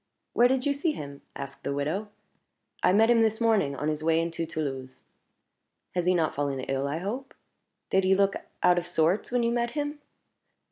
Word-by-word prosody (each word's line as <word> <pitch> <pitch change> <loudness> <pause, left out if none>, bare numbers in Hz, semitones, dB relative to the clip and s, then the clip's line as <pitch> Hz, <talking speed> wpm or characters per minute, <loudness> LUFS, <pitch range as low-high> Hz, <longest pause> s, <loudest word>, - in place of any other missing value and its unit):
"Where 240 - +6
did 260 0 0
you 285 - +3
see 300 +3 0
him?" 140 - -8
asked 140 0 -8
the 140 - -2
widow. 155 +9 -1 0.7
"I - - +4
met 220 +4 +5
him 235 -1 +5
this 220 -1 +2
morning, 215 -12 +2
on 150 - -3
his 155 0 -1
way 165 0 +3
into 165 0 -2
Toulouse." 135 -5 -5 0.9
"He 180 - 0
has 175 - -1
not 175 -3 +2
fallen 140 -2 -1
ill, 135 +1 -1
I 145 +3 -2
hope? 235 +10 -5 0.6
Did 190 0 +3
he 190 +1 +4
look 195 0 +3 0.3
out 175 0 +5
of 175 - -7
sorts 175 +5 +1
when 245 -1 +2
you 235 - +2
met 235 0 0
him?" 290 0 -2
180 Hz, 195 wpm, -27 LUFS, 150-230 Hz, 0.9 s, Where